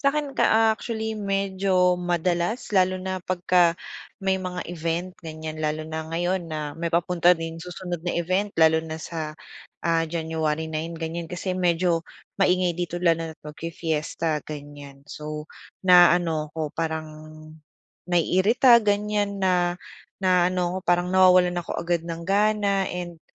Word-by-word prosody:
Sa'kin 280 0 0
ka 220 0 +4
actually 220 0 -4
medyo 195 -2 +1
madalas 175 +5 -1
lalo 185 -1 +3
na 185 0 -3
pagka 180 -1 +2 0.4
may 190 -1 +1
mga 180 -1 -4
event 170 +2 -3
ganyan. 155 -1 -7
Lalo 155 0 -1
na 160 0 -5
ngayon 175 +1 -1
na 155 -2 -4
may 170 +1 -2
papunta 175 +1 +4
rin 165 0 -6
susunod 180 0 -6
na 175 - -1
event 185 +4 0
lalo 160 0 +5
na 160 0 -6
sa, 155 -2 -5 0.5
ah, 165 0 +2
January 160 -1 -2
9 165 +2 -4
ganyan 165 0 -5
kasi 180 +1 -3
medyo 175 -1 +2 0.4
maingay 180 -2 +3
dito, 175 -1 -3
lalo 165 -2 +2
na't 160 - -12
mag-fi-fiesta 160 0 -3
ganyan. 145 -2 -10
So, 150 0 -6 0.4
naaano 175 -3 +5
ako, 155 -2 -4
parang 160 -1 -3 1.0
naiirita 200 +8 +4
ganyan, 205 -1 0
na 180 -2 +2 0.4
naaano 180 -1 +2
ako - - -1
parang 175 0 +3
nawawalan 185 -1 +5
ako 170 - -5
agad 170 -1 -1
ng 165 0 -5
gana 200 0 +2
and 175 -2 -6
175 Hz, 135 wpm, -24 LUFS, 160-185 Hz, 1.0 s, lalo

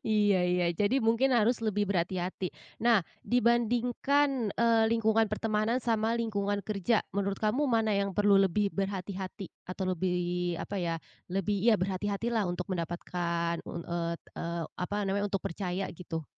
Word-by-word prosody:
Iya 205 -3 +3
iya, 180 -1 +2
jadi 205 +9 +1
mungkin 240 +3 +3
harus 235 +2 +3
lebih 210 -2 0
berhati-hati. 185 -1 -1 0.3
Nah, 230 -6 +4 0.2
dibandingkan, 245 +2 +2
eee, 230 -1 +4
lingkungan 225 -1 +3
pertemanan 215 +2 0
sama 225 0 +1
lingkungan 205 -3 -1
kerja, 215 +1 +1
menurut 200 0 -1
kamu 245 +7 +1
mana 225 -3 +2
yang 200 -2 0
perlu 205 -1 +5
lebih 195 +1 +2
berhati-hati 195 -1 -4 0.2
atau 185 +1 -3
lebih 180 -1 -1
apa 200 - -5
ya, 170 -1 -1 0.3
lebih, 195 +2 -1
ya 225 +1 +5
berhati-hatilah 200 +3 -1
untuk 180 +2 -3
mendapatkan, 170 0 -2
un 170 - -5
eee 170 -1 -2 0.2
eee, 170 0 -3 0.2
apa 190 +3 -2
namanya, 200 +1 0
untuk 195 -2 -2
percaya 185 +1 -2
gitu? 165 -2 -6
200 Hz, 145 wpm, -30 LUFS, 180-225 Hz, 0.3 s, perlu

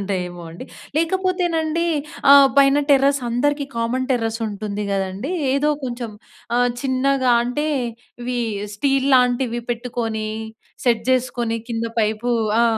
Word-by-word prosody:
ఉంటాయేమో 180 -3 -3
అండి. 170 +9 -9 0.3
లేకపోతేనండి 340 -2 0 0.5
ఆహ్, 280 -1 +8
పైన 275 0 +6
టెర్రస్ 275 0 +4
అందరికీ 285 +4 0
కామన్ 245 +3 -1
టెర్రస్ 225 -2 -1
ఉంటుంది 205 0 -4
గదండీ! 195 - -2 0.2
ఏదో 295 +2 +2
కొంచెం 240 -2 -4 0.5
ఆహ్, 245 0 +3
చిన్నగా 260 -1 +2
అంటే 250 +5 -2 0.6
ఇవి 245 0 -2 0.4
స్టీల్ 275 +2 +1
లాంటివి 245 -1 +1
పెట్టుకొని 230 -2 -3 0.6
సెట్ 230 -2 +2
జేసుకొని 240 -3 0
కింద 230 0 -2
పైపు 215 +3 0 0.3
ఆ! - - +5
245 Hz, 115 wpm, -21 LUFS, 225-275 Hz, 0.6 s, ఆహ్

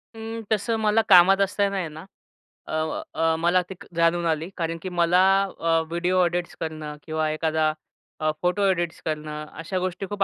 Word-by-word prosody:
अं, 225 0 -6
तसं 220 +2 +1
मला 215 +1 +4
कामात 190 +2 +7
असताना 200 0 +1
आहे 175 -3 -2
ना 160 +4 -10 0.6
अ, - - -7
व 160 - -3
अ, 165 0 +2
मला 175 +2 +3
ते 190 - -7 0.2
जाणून 170 +1 +2
आली. 160 +2 -1
कारण 165 -1 -2
की 185 - -5
मला 175 0 +3 0.4
अ, 165 -1 +2
व्हिडिओ 180 +2 +1
एडिट्स 175 0 -2
करणं 155 -2 -5
किंवा 155 -1 -1
एखादा 155 0 +1 0.5
अ, 155 0 +1
फोटो 180 +3 +1
एडिट्स 175 -2 -3
करणं 150 -1 -4
अशा 185 +3 -3
गोष्टी 185 +1 -3
खूप 200 -1 0
175 Hz, 175 wpm, -24 LUFS, 160-185 Hz, 0.6 s, कामात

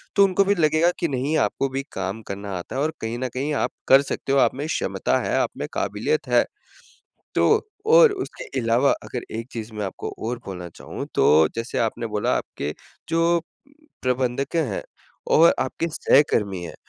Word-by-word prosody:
तो 200 - +7
उनको 195 +1 +3
भी 200 +1 +2
लगेगा 155 0 +3
कि, 170 - +1
नहीं 140 +2 -1
आपको 135 -1 0
भी 135 +1 -3
काम 95 +3 -3
करना 100 +1 -5
आता 90 - -8
है, 135 - 0
और 155 +2 0
कहीं 115 +1 -3
न 130 - -1
कहीं 140 +4 -2
आप - - 0 0.2
कर 135 +1 +8
सकते 140 -1 -4
हो 140 - +4
आप - - +4
में 140 +3 -4
क्षमता - - 0
है - - -1
आप - - +2
में - - -3
काबिलियत 460 +1 -1
है। - - +4 0.9
तो - - +4 0.4
और 475 -2 +8
उसके 390 -1 -5 0.2
अलावा 120 +3 +3
अगर 125 - -5
एक 115 +1 -5
चीज़ 115 -1 -6
मैं 105 -1 -3
आपको 95 - -5 0.2
और 120 +1 -2
बोलना 90 -2 -6
चाहूँ - - -7
तो 80 +1 +5
जैसे 115 +1 -4
आपने 115 0 -1
बोला 105 -1 0
आपके 75 +1 -5 0.4
जो, 165 +1 +2 0.6
प्रबंधक 130 +3 -1
हैं 160 -5 0 0.5
और 165 +1 +7
आपके 165 +5 -1
सहकर्मी 105 - +2
हैं 85 - -7
130 Hz, 185 wpm, -23 LUFS, 110-160 Hz, 0.9 s, कर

